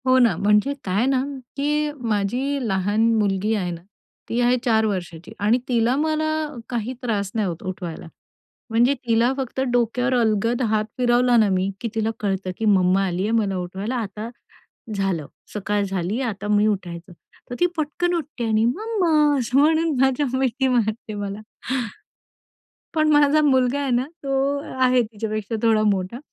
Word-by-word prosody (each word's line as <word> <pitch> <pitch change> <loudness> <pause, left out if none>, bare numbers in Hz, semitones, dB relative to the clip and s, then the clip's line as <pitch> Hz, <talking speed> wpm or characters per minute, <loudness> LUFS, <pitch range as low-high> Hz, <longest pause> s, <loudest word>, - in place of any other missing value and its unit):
हो 255 0 +5
ना, 235 -8 +4
म्हणजे 210 +7 +3
काय 200 +5 +1
ना 265 -1 +2 0.3
की 295 +2 0 0.2
माझी 245 +6 -1
लहान 200 +2 0
मुलगी 205 0 +1
आहे 180 -4 -2
ना, 170 -1 -7 0.5
ती 235 - -1
आहे 245 +1 +3
4 220 -2 +3
वर्षाची 175 -5 -4
आणि 210 +4 +3
तिला 240 0 +2
मला 310 +1 0 0.4
काही 240 0 -2
त्रास 205 -6 -2
नाही 215 -3 +1
होत 170 0 -5
उठवायला. 175 -3 -6 0.6
म्हणजे 240 +5 +3
तिला 230 +2 +3
फक्त 265 -1 -3
डोक्यावर 245 +2 +1
अलगद 230 +2 +1
हात 215 -1 +2
फिरवला 245 0 +3
ना 220 -3 +5
मी 185 +1 0
की 235 - -2
तिला 220 0 0
कळतं 195 -2 -2
की 225 - -3
मम्मा 195 -2 +3
आलीये 185 +3 -1
मला 195 -3 -1
उठवायला. 190 +6 -4
आता 215 -1 -4 0.7
झालं, 190 -6 -1 0.3
सकाळ 205 0 -1
झाली, 195 +3 -2
आता 205 -5 -3
मी 210 0 +3
उठायच, 180 -5 -2 0.5
तर 245 - -4
ती 355 - +4
पटकन 315 +3 -1
उठते 295 -7 -4
आणि 220 0 +2
"मम्मा" 400 - 0 0.3
असं 250 +1 0
म्हणून 315 +1 +3
माझ्या 265 +2 +2
मिठी 265 0 +1
मारते 220 -3 0
मला. 205 0 -4 1.6
पण 310 -1 +3
माझा 295 +1 +5
मुलगा 265 -2 +2
आहे 280 - -2
ना 245 +1 +2 0.2
तो 275 - -3 0.5
आहे 255 -1 +4
तिच्यापेक्षा 215 0 -4
थोडा 220 -2 +4
मोठा 190 +4 -3
225 Hz, 155 wpm, -22 LUFS, 200-255 Hz, 1.6 s, हो